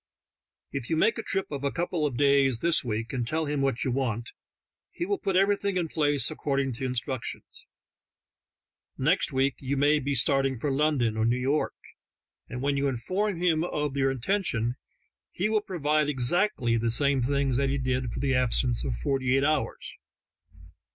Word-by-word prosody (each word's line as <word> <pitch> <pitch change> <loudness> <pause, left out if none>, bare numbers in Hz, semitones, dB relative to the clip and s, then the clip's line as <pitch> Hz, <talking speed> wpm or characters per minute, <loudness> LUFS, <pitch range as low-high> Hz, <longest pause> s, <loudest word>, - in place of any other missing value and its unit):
If 120 - -5
you 160 - +1
make 225 +7 +2
a - - -1
trip 195 -5 -1
of 140 -1 -5
a 140 - +1
couple 170 -3 -1
of 125 -4 -5
days 140 -3 +3
this 170 -2 +3
week, 115 0 -3
and 120 -3 -2
tell 160 +4 -1
him 145 -1 -1
what 135 -3 0
you 130 - -1
want, 120 -3 -2 0.6
he 345 - -4
will 405 +1 -1
put 195 - -1
everything 200 0 +2
in 175 -2 0
place 145 -2 +2
according 140 -3 -1
to 130 +3 -5
instructions. 130 0 -4 1.3
Next 155 +6 +1
week 135 0 +1
you 135 +1 -2
may 145 +2 +3
be 140 0 -2
starting 135 +1 +2
for 145 +3 -1
London 135 -6 +1
or 110 - +1
New 120 +2 +2
York, 135 +4 0 0.7
and 125 +1 -5
when 140 0 +1
you 140 0 +1
inform 185 - -2
him 165 -3 +2
of 150 -5 -2
your 135 -1 +2
intention 130 - -1 0.6
he 195 +4 -1
will 215 -1 +2
provide 150 -6 0
exactly 130 - +1
the 115 +1 0
same 140 +3 +2
things 135 0 0
that 140 0 +1
he 140 - 0
did 130 -2 -1
for - - -5
the 135 -2 0
absence 125 -1 +1
of 65 -4 -2
forty 135 -1 +1
eight 135 - +1
hours. 150 -1 -2
140 Hz, 180 wpm, -27 LUFS, 125-155 Hz, 1.3 s, days